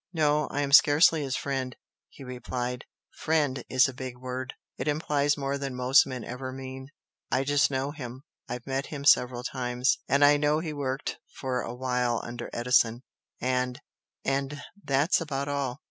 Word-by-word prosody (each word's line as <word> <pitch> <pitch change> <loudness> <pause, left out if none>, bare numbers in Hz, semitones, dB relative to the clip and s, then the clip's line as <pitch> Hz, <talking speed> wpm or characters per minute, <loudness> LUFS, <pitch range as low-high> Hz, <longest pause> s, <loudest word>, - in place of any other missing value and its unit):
"No, 150 -2 +2
I 145 - -2
am 140 -1 -1
scarcely 150 +3 +6
his 135 -2 -2
friend" 130 -1 -3 0.3
he 140 - -13
replied 125 0 -4 0.3
"'Friend' 150 -4 0
is 130 +1 +5
a 130 - -6
big 130 -1 -7
word, 130 +1 -5 0.2
it - - -5
implies 145 -1 +1
more 140 0 -2
than 135 -2 -4
most 125 +3 +5
men 130 -3 -5
ever 130 +3 -6
mean. 130 0 -8 0.4
I 130 - +1
just 145 0 +3
know 135 +1 -1
him 130 -3 -8 0.3
I've 125 0 -5
met 135 +1 -2
him 140 -2 -6
several 125 -3 +4
times, 125 0 0
and 140 +1 +5
I 145 0 +6
know 150 +1 +2
he 160 -1 -3
worked 135 -1 -3 0.2
for 130 -2 -2
a 120 - -5
while 125 -2 0
under 120 0 -6
Edison 120 0 +2 0.4
and 125 0 -1 0.5
and 140 +1 -1 0.2
that's 145 +6 +2
about 140 -3 -3
all. 140 -3 -2
135 Hz, 170 wpm, -28 LUFS, 125-145 Hz, 0.5 s, scarcely